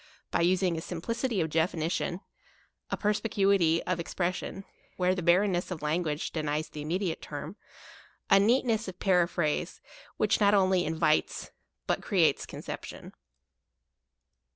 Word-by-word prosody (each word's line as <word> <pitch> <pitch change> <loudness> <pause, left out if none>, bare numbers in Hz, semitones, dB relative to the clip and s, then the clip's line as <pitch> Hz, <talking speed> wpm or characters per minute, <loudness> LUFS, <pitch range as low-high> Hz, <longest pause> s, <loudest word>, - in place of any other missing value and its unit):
by - - +1
using 180 0 +2
a 160 - -3
simplicity 220 +7 -2
of 160 -1 -2
definition, 165 +2 -1 0.7
a - - -2
perspi 210 +2 0
cuity 195 -5 +3
of 180 -1 -1
expression, 175 +2 -2
and, 195 - -8 0.3
where 180 0 +2
the 185 - -3
barren 180 +4 +4
ness 175 0 -1
of 170 -5 -6
language 155 0 -1
denies 155 -1 -2
the 150 - -7
immediate 170 +3 -2
term, 150 +5 -7 0.7
a 195 - +6
neatness 225 0 +2
of 185 -1 -7
periphrase 175 -5 +1 0.4
which - - +2
not 205 0 +5
only 185 -2 +3
in 160 +1 -2
vites 155 -1 +1 0.3
but - - 0
creates - - +2
conception. - - -8
180 Hz, 140 wpm, -29 LUFS, 160-195 Hz, 0.7 s, a